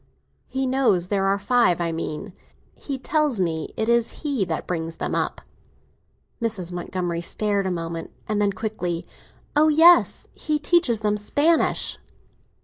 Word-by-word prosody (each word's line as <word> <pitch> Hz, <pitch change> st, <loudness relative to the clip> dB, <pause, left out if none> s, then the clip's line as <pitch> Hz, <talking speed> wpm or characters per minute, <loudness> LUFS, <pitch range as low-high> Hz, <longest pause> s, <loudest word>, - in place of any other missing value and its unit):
"He 265 Hz, 0 st, -2 dB
knows 250 Hz, -9 st, +2 dB
there 195 Hz, -1 st, +1 dB
are 195 Hz, +1 st, +2 dB
five, 205 Hz, -3 st, +2 dB
I 170 Hz, -1 st, -1 dB
mean. 165 Hz, +4 st, -5 dB, 0.4 s
He 275 Hz, -2 st, -5 dB
tells 295 Hz, -3 st, 0 dB
me 160 Hz, -4 st, -1 dB
it 220 Hz, -, -1 dB
is 235 Hz, +3 st, +1 dB
he 280 Hz, -8 st, 0 dB
that 165 Hz, -3 st, -3 dB
brings 165 Hz, -2 st, -4 dB
them -, -, -3 dB
up." -, -, -2 dB, 1.0 s
Mrs. 205 Hz, -7 st, -1 dB
Montgomery 175 Hz, -1 st, -3 dB
stared 200 Hz, +2 st, 0 dB
a -, -, -1 dB
moment, 165 Hz, -1 st, -4 dB, 0.2 s
and 210 Hz, -1 st, 0 dB
then 205 Hz, -1 st, +2 dB
quickly—"Oh 200 Hz, -, -3 dB
yes; 330 Hz, +3 st, +5 dB
he 305 Hz, -1 st, -1 dB
teaches 295 Hz, -8 st, +3 dB
them 210 Hz, -1 st, +1 dB
Spanish." 295 Hz, +10 st, +1 dB
205 Hz, 140 wpm, -23 LUFS, 175-265 Hz, 1.0 s, yes